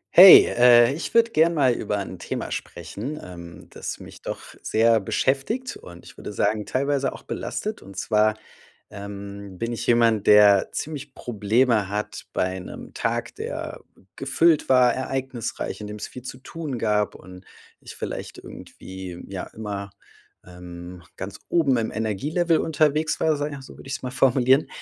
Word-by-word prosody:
Hey, 185 +1 +11
äh, 120 0 +6
ich 160 - -6
würde 230 0 +5
gerne 165 -3 +3
mal 135 -5 +4
über 105 -3 -2
'n 95 -3 -6
Thema - - -5
sprechen, 105 - -6
ähm, 85 -1 -11
das - - -6
mich - - -12
doch - - -7
sehr 115 0 +3
beschäftigt 135 - -1
und 85 -1 -13
ich - - -14
würde - - -7
sagen, 105 0 0
teilweise 140 0 0
auch - - -12
belastet. 215 +1 -4
Und 100 -1 -13
zwar, 110 +1 +2 0.6
ähm, 100 -1 -8
bin 115 +5 -3
ich 115 - -5
jemand, 115 -3 +3
der 105 -2 +6
ziemlich 145 -3 -6
Probleme 110 -1 +1
hat 105 +1 -4
bei 95 0 -1
'nem 90 - -10
Tag, - - -2
der - - -5 0.3
gefüllt 150 +4 +2
war, 125 -2 +5
ereignisreich, 130 -4 -4
in 105 - -6
dem 105 - -7
es 105 - -6
viel 125 - -10
zu 125 +1 -8
tun 145 0 -6
gab 105 -2 0
und 90 0 -13 0.4
ich - - -11
vielleicht - - -6
irgendwie, 95 -2 -10
ja, 95 -2 -5
immer, 100 -2 -6 0.6
ähm, 90 0 -10
ganz 95 +1 -7
oben 145 -7 +2
im 115 -1 -1
Energie-Level 150 - 0
unterwegs 155 0 +1
war, 155 -2 +2
sage 145 +1 -3
ich - - -5
also, 135 - -12
würde - - -13
ich 135 - -4
es - - -8
mal 125 - -4
formulieren, 130 +1 +3
115 Hz, 165 wpm, -24 LUFS, 100-140 Hz, 0.6 s, Hey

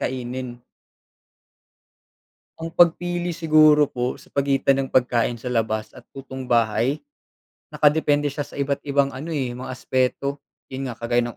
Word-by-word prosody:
kainin. 125 -1 -4 2.0
Ang 165 0 -6
pagpili 175 +1 +2
siguro 155 -3 +5
po 125 +1 -3
sa - - -18
pagitan 135 -1 +2
ng 135 - -7
pagkain 120 -2 +1
sa 125 - -7
labas 110 -3 -1
at - - -13
lutong 130 -1 -8
bahay, 115 +4 +2 0.7
nakadepende 145 -1 +2
siya 145 - -5
sa - - -13
iba't 140 0 -1
ibang 140 0 +2
ano, 140 +6 -7
eh, 130 -4 -1
mga 125 +2 -7
aspeto. 130 +2 -1 0.3
Yun 130 0 -4
nga, 120 - -6
kagaya 120 +1 +1
ng 120 - -9
135 Hz, 145 wpm, -23 LUFS, 125-145 Hz, 2.0 s, siguro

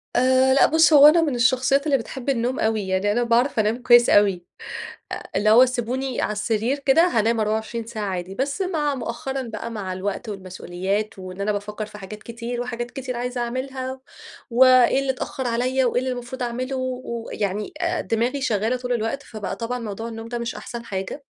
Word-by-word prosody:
آآ، 260 +1 +4
لأ 275 - +6
بُص 320 0 +4
هو 290 0 +10
أنا 330 +2 +6
من 295 -5 0
الشخصيّات 260 +3 +2
اللي 285 -3 +3
بتحبّ 255 +2 -6
النوم 250 0 0
أوي، 220 -3 0
يعني 190 +2 +1
أنا 240 +3 +1
باعرف 235 +1 +2
أنام 215 +2 +1
كويّس 240 -1 +6
أوي، 195 -4 +4 0.7
آآ - - -6
اللي 215 +1 +3
هو 245 +4 +8
سيبوني 255 +1 -2
على - - 0
السرير 220 +5 -1
كده 280 +4 +4
هانام 230 -6 +1
24 220 +2 -2
ساعة 220 -2 -5
عادي، 185 -1 -4
بس 275 - -2
مع 305 -6 0
مؤخرًا 265 +2 -4
بقى 230 0 -6
مع 200 -4 -4
الوقت 200 +4 -4
والمسؤوليات 190 +1 -4
وإن 185 +1 -8
أنا 210 +1 +1
بافكّر 210 +1 -4
في 210 - -11
حاجات 210 +2 -9
كتير 235 +1 -5
وحاجات 240 -1 -4
كتير 255 -2 -5
عايزة 245 +1 -3
أعملها 260 +2 -4 0.5
و 245 +3 +6
إيه 255 0 +6
اللي 270 -1 0
تأخّر 260 0 -5
عليَّ 255 +3 +1
وإيه 245 0 +1
اللي 255 0 -2
المفروض 245 +1 -6
أعمله 255 +3 -3
ويعني 235 -5 -3 0.3
دماغي 245 +3 -1
شغّالة 220 +1 +1
طول 250 0 -3
الوقت، 235 +4 -2
فبقى 215 -7 -6
طبعًا 240 +2 -3
موضوع 225 0 -5
النوم 225 0 -7
ده 240 0 -3
مش 235 0 -4
أحسن 235 -1 -7
حاجة. 195 +8 -5
235 Hz, 190 wpm, -23 LUFS, 215-260 Hz, 0.7 s, هو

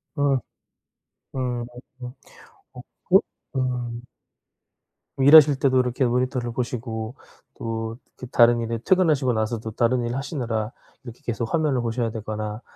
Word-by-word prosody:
어. 140 -2 +2 1.0
음. 125 -2 -2 1.1
어 - - -9 0.3
그 - - +7 0.4
음. 125 -2 -2 1.1
일하실 145 +1 +8
때도 130 -2 +3
이렇게 125 +1 +1
모니터를 125 0 0
보시고 115 -1 -4 0.4
또 115 0 -4 0.2
그 125 - -7
다른 120 0 +5
일에 115 0 -2
퇴근하시고 155 -9 +3
나서도 110 0 -2
다른 120 +2 +1
일 120 - -2
하시느라 120 -6 -3 0.3
이렇게 120 -1 -10
계속 115 +1 -3
화면을 150 -5 +1
보셔야 115 0 -1
되거나 110 0 -5
120 Hz, 260 characters per minute, -24 LUFS, 115-130 Hz, 1.1 s, 일하실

